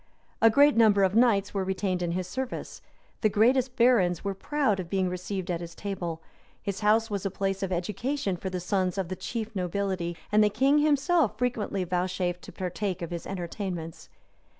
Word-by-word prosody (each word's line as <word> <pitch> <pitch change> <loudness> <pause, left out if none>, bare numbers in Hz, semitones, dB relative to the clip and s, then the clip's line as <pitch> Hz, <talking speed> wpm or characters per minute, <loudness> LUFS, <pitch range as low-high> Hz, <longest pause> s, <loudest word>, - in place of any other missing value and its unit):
[*] - - -37
A 225 - +8
great 285 +5 +5
number 215 -3 +5
of 190 0 +2
knights 215 -4 +3
were 195 -2 0
retained 190 -1 -1
in 170 -1 -1
his 185 +1 -2
service; 260 +6 -5 0.4
the 215 - +4
greatest 245 +5 +3
barons 230 -9 +3
were 200 0 -1
proud 240 0 0
of 175 -2 -5
being 190 -1 +1
received 180 +1 -4
at 170 -1 -2
his 170 0 -8
table; 175 -5 -4 0.4
his 200 -1 -4
house 220 +1 +2
was 200 -2 -2
a 195 - 0
place 195 0 -2
of 190 -1 -2
education 200 +5 -2
for 190 +2 -5
the 185 -1 -3
sons 185 +1 -1
of 190 -3 -2
the 185 - -3
chief 225 +3 -5
nobility; 180 -2 -2
and 210 +1 +5
the 210 - +4
king 270 +7 +3
himself 295 - +2
frequently 225 -5 -1
vouchsafed 180 0 -1
to - - -10
partake 185 0 -3
of 170 - -5
his 170 -1 -5
entertainments. 175 -3 -5
195 Hz, 195 wpm, -27 LUFS, 180-225 Hz, 0.4 s, A